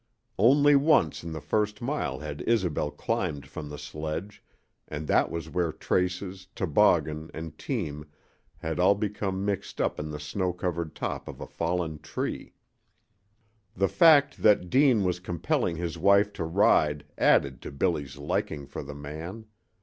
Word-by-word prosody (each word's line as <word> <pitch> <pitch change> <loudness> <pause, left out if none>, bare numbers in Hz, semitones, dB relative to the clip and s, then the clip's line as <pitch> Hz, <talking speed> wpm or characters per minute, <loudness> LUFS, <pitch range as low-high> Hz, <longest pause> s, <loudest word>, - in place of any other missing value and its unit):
Only 145 +6 +6
once 140 - +3
in 85 - -6
the 80 - -4
first 105 +4 -1
mile 120 - -2
had 75 -1 -6
Isobel 90 -10 +1
climbed 70 -1 -2
from 75 +2 -8
the 75 - -7
sledge, 80 +9 -6 0.5
and 75 0 -5
that - - +3
was 85 -1 -5
where 85 0 -1
traces, 90 +3 -2
toboggan, 80 -4 +2
and 80 -1 -6
team 75 - -4 0.5
had 80 +1 -4
all 95 +3 +5
become 100 -2 -2
mixed 100 -1 -3
up - - 0
in 75 +1 -4
the 75 -1 -5
snow 90 +5 -2
covered 85 -3 -3
top - - -4
of - - -8
a - - -5
fallen 85 -2 -2
tree. - - -5 1.2
The 95 - +2
fact 150 - +5
that 100 -4 +4
Deane 130 -6 +4
was 90 -1 0
compelling 85 -1 -1
his 85 0 -4
wife 100 +3 +4
to 85 - -3
ride 80 -4 +3
added 70 -2 +3
to - - -7
Billy's 70 -2 -1
liking 70 0 -2
for - - -7
the 70 +1 -8
man. 80 +9 -7
85 Hz, 155 wpm, -27 LUFS, 75-100 Hz, 1.2 s, Only